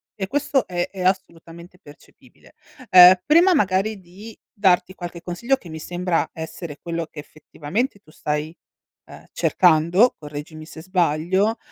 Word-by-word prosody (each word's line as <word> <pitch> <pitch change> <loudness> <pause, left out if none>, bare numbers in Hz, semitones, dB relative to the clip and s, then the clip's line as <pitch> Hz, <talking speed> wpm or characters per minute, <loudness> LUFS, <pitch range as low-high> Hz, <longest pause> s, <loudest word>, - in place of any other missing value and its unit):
e 190 -2 -4
questo 290 +1 0
è 175 -1 -3
è 190 -2 -9
assolutamente 170 -2 -4
percepibile. 145 -4 -20 0.4
Uhm, 180 0 +9
prima 345 +5 +5
magari 200 - 0
di 190 +5 -13 0.2
darti 185 -2 +2
qualche 175 -1 -8
consiglio, 235 +11 -1
che 180 - -15
mi 160 0 -8
sembra 175 +1 -2
essere 160 -1 -8
quello 170 -1 -4
che 160 - -12
effettivamente 160 - -5
tu 155 -6 -22
stai, 150 +2 -4 0.6
uhm, - - -13
cercando, 180 +6 +3
correggimi 150 +1 -9
se 160 0 -11
sbaglio, 185 +4 0
180 Hz, 140 wpm, -21 LUFS, 160-195 Hz, 0.6 s, Uhm